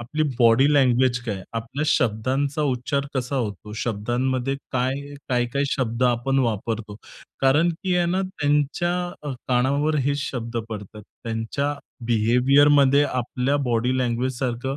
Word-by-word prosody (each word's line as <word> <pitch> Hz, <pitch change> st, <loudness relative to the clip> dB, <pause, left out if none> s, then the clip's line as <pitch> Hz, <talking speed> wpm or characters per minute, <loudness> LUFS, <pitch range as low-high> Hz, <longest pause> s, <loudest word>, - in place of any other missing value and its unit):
आपली 140 Hz, +6 st, -2 dB, 0.2 s
body 120 Hz, +5 st, +5 dB
language 125 Hz, -2 st, +3 dB
काय? 100 Hz, -5 st, -4 dB
आपल्या 120 Hz, +7 st, -3 dB
शब्दांचा 130 Hz, +6 st, 0 dB
उच्चार 140 Hz, +1 st, -1 dB
कसा 130 Hz, +1 st, -2 dB
होतो? 105 Hz, -4 st, -4 dB
शब्दांमध्ये 125 Hz, +4 st, -1 dB, 0.2 s
काय 135 Hz, +3 st, -2 dB
काय-काय 125 Hz, +3 st, 0 dB
शब्द 120 Hz, -1 st, -1 dB
आपण 125 Hz, +3 st, +1 dB
वापरतो? 110 Hz, -3 st, -2 dB, 0.4 s
कारण 150 Hz, +6 st, +4 dB
की 185 Hz, -, +1 dB
आहे 175 Hz, -1 st, +2 dB
ना 190 Hz, +1 st, +1 dB
त्यांच्या 150 Hz, -1 st, 0 dB, 0.3 s
अ, -, -, -2 dB, 0.2 s
कानावर 140 Hz, +5 st, +2 dB
हे 145 Hz, -, +2 dB
शब्द 120 Hz, -4 st, -4 dB
पडतात. 105 Hz, 0 st, -8 dB, 0.2 s
त्यांच्या 115 Hz, +6 st, -2 dB, 0.3 s
बिहेवियरमध्ये 135 Hz, +5 st, +4 dB
आपल्या 125 Hz, +2 st, -1 dB
बॉडी 120 Hz, +2 st, +1 dB
लँग्वेजसारखं 125 Hz, +1 st, -1 dB
130 Hz, 120 wpm, -23 LUFS, 115-140 Hz, 0.4 s, बॉडी